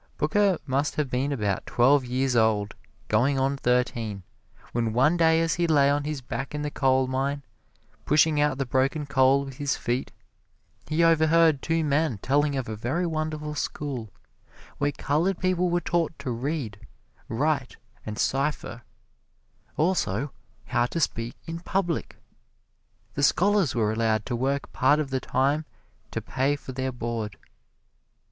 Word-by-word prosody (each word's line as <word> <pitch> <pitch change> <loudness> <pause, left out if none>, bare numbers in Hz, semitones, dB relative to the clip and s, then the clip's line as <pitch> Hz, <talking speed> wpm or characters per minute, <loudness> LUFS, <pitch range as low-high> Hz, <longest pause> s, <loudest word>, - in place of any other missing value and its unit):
Booker 195 +5 +2
must 140 +2 0
have 145 -4 -1
been 130 +3 0
about 105 -8 -1
twelve 135 +3 +4
years 130 +1 0
old, 110 -2 +2 0.3
goin' 130 +6 +2
on 135 +1 +1
thirteen, 120 -6 -1 0.5
when 115 -2 -1
one 135 +8 +4
day 165 -1 +4
as 165 -1 +1
he 175 -1 0
lay 140 -3 +4
on 145 0 0
his 150 -2 -3
back 135 +3 -5
in 150 - -3
the 150 - -3
coalmine, 135 +1 +1 0.6
pushing 150 +2 +3
out 145 -3 +1
the 135 - -1
broken 135 +4 0
coal 140 0 +3
with 135 -1 -9
his 145 -2 -1
feet, 120 +2 -2 0.8
he 160 +2 +1
overheard 160 -2 +4
two 165 0 0
men 150 -4 +1
telling 145 +6 +1
of 130 -2 -2
a 110 - -4
very 130 +12 -1
wonderful 155 -2 -3
school 140 -6 -4 0.7
where 145 0 +1
colored 165 +7 0
people 180 -1 +1
were 175 0 +2
taught 170 -1 -1
to 140 -3 -4
read, 120 -3 -3 0.5
write 135 +2 -1 0.3
and 105 -1 -6
cipher 135 -3 -1 1.0
also, 145 - 0 0.3
how 120 +2 +1
to 165 - -3
speak 115 -6 -1
in 165 0 -5
public. 175 -2 -2 1.0
The 140 - -3
scholars 190 +2 +3
were 110 -2 +1
allowed 110 -1 +1
to 125 - -2
work 135 +3 -2
part 145 +4 +3
of 145 -3 -2
the 130 - 0
time 140 +5 0 0.4
to - - -4
pay 135 +3 0
for 140 - -9
their 130 0 -2
board. 115 -4 -4
140 Hz, 155 wpm, -26 LUFS, 125-155 Hz, 1.0 s, twelve